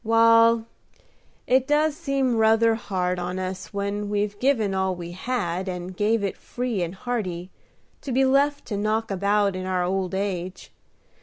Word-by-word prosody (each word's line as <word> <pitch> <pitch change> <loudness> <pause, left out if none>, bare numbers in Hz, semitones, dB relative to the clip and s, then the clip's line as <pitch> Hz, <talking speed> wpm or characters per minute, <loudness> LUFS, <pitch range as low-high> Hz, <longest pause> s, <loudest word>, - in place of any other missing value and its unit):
"Wal, 230 0 +5 0.8
it 260 +1 +2
does 300 0 +2
seem 275 -6 0
ruther 225 +1 +4
hard 185 -5 -2
on 180 +1 -3
us 185 -2 -5
when 200 +1 -3
we've 205 0 -1
give 270 -1 +3
all 190 -1 0
we 175 -1 -7
had, 185 -2 -2
and 180 0 -6
give 210 +2 +1
it 195 - -2
free 245 -5 -3
and 175 +2 -3
hearty, 190 -6 -4 0.5
to 275 - -5
be 265 +2 +3
left 285 +2 +2
to 205 - -2
knock 215 +1 -1
about 200 +1 +1
in 185 0 -4
our 185 -1 0
old 185 0 -1
age. 185 -2 -4
205 Hz, 160 wpm, -24 LUFS, 185-230 Hz, 0.8 s, Wal